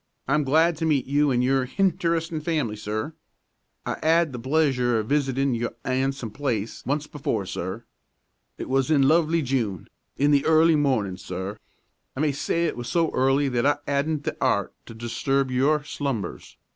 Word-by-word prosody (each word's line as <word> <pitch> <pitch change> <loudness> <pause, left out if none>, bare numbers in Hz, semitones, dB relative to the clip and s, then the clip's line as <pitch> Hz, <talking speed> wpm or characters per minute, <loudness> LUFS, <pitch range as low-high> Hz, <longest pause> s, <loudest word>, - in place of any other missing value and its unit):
I'm 150 +3 +2
glad 160 +4 +3
to 160 - -2
meet 145 -4 +2
you 145 +1 +2
an' 125 -1 +2
your 130 0 +1
hinteresting 165 -1 0
family, 150 -9 -1
sir. 110 +7 -4 0.7
I - - -3
'ad 165 -2 +3
the 120 - -5
pleasure 130 -2 +1
o' 110 - 0
visitin' 135 +1 0
your 120 0 -3
'andsome 130 -2 -1
place 115 -4 -3
once 145 +2 0
before, 140 -9 -3
sir. 95 +6 -5 0.7
It - - -6
was 135 +1 +1
in 145 -3 +4
lovely 165 +1 +3
June, 115 - -2 0.3
in 145 +1 +3
the 140 -1 +4
early 160 +1 +5
mornin', 125 -11 +1
sir. 95 +3 -6 0.6
I - - -6
may 150 -1 +2
say 165 +4 -1
it 165 - -1
was 120 0 -5
so 165 +1 +1
early 135 +2 +2
that 125 0 0
I 145 - +3
'adn't 145 +1 -1
the - - -3
'eart - - +1
to 115 - -10
disturb 130 +4 -1
your 145 +4 +2
slumbers. 140 -7 -4
135 Hz, 170 wpm, -25 LUFS, 120-155 Hz, 0.7 s, early